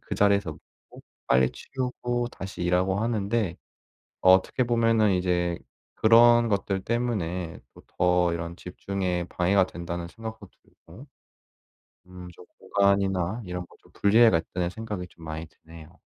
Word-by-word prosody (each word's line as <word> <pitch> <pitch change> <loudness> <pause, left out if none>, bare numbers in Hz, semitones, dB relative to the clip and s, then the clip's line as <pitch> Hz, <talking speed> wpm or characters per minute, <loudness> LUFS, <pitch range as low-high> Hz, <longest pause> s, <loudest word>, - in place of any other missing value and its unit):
그 - - -6
자리에서 100 -3 +2 0.4
먹고 - - -14 0.3
빨리 65 0 +4
치우고 120 -2 -3
다시 95 -2 -7
일하고 90 +2 +1
하는데 110 -4 -1 0.6
어떻게 95 +7 +4
보면은 115 -3 +2
이제 90 -1 0 0.4
그런 120 +1 +5
것들 100 -1 -1
때문에 95 -8 -2 0.2
또 - - -16 0.2
더 90 -1 +3
이런 85 0 -5
'집중에 90 -1 -3
방해가 95 +2 +2
된다.'는 85 -1 -6
생각도 110 0 -9
들고 100 - -16 1.0
음 90 -1 -11
좀 90 - -15 0.2
'공간이나 100 +1 +1
이런 90 -1 -5
거 - - -21
좀 - - -24
분리해야겠다.'는 95 -5 +3
생각이 105 -4 -6
좀 80 - -16
많이 80 +1 -6
드네요. 80 +2 -16
95 Hz, 295 characters per minute, -26 LUFS, 85-110 Hz, 1.0 s, 그런